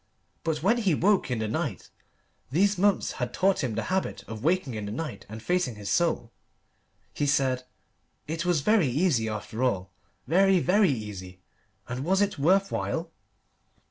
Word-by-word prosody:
But 160 -2 -2
when 230 +6 +3
he 195 -8 +2
woke 195 +2 +2
in 125 - -1
the 110 -1 -2
night 120 - -3 0.6
these 195 +9 +3
months 200 +1 +2
had 125 -1 -2
taught 190 -4 +2
him 120 -5 -2
the 115 - -1
habit 190 - -1
of 110 0 -7
waking 165 -5 +1
in 105 -2 -4
the - - -4
night 125 -4 -5
and 110 +1 -8
facing 180 -10 0
his 105 -1 -5
soul 160 -9 +1 0.8
he 145 - -1
said 130 -2 +1 0.6
"It 165 +2 -2
was 175 -5 +2
very 210 -1 +3
easy, 130 -4 +1
after 110 +2 -5
all 100 -7 0 0.3
very, 190 +6 +4
very 190 +3 +3
easy. 100 -7 -5 0.5
And 125 +2 -4
was 190 +5 +2
it 205 -5 0
worth 190 +7 +3
while?" - - -2
145 Hz, 170 wpm, -27 LUFS, 115-185 Hz, 0.8 s, very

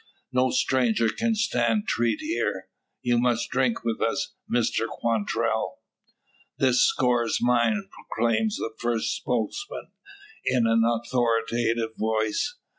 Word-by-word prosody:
"No 130 0 +3
stranger 115 -4 +2
can 225 - 0
stand 120 - +1
treat 115 - 0
here. 315 +2 -2 0.3
You 120 -1 +2
must 120 -1 0
drink 130 -2 +1
with 115 -1 -1
us, 135 +5 -1 0.2
Mr 115 -1 +1
Quantrell." 115 -3 -1 0.8
"This 125 -2 +3
score's 120 -3 +2
mine!" 125 - +2 0.2
proclaims 120 - +1
the 115 - -4
first 120 -2 0
spokesman, 125 - -3 0.5
in 125 -2 +2
an 115 0 +3
authoritative 115 -1 0
voice. 110 - 0
120 Hz, 115 wpm, -26 LUFS, 115-130 Hz, 0.8 s, No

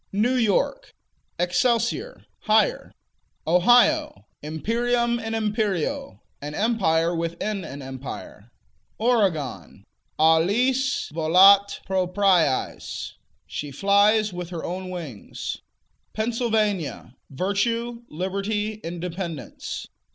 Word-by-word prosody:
New 215 +6 +1
York 250 - 0 0.5
Excelsior: 235 - 0 0.2
Higher. - - +2 0.5
Ohio 245 - +4 0.2
Imperium 235 +9 0
in 225 -1 -4
imperio: 210 - -2 0.2
An 145 +1 -6
empire 175 -7 +1
within 170 +5 -3
an 140 -3 -8
empire. 130 0 -8 0.5
Oregon 165 - 0 0.3
Alis 205 - +2
volat 190 +5 +5
propriis: 185 -5 0 0.3
She 145 - -5
flies 200 +6 +3
with 175 -1 -6
her 170 -3 -6
own 185 +1 -4
wings. 160 - -6 0.6
Pennsylvania 215 - -1
Virtue, 230 - -1
Liberty, 205 +5 -3
Independence. 170 -1 -5
195 Hz, 80 wpm, -24 LUFS, 165-225 Hz, 0.6 s, volat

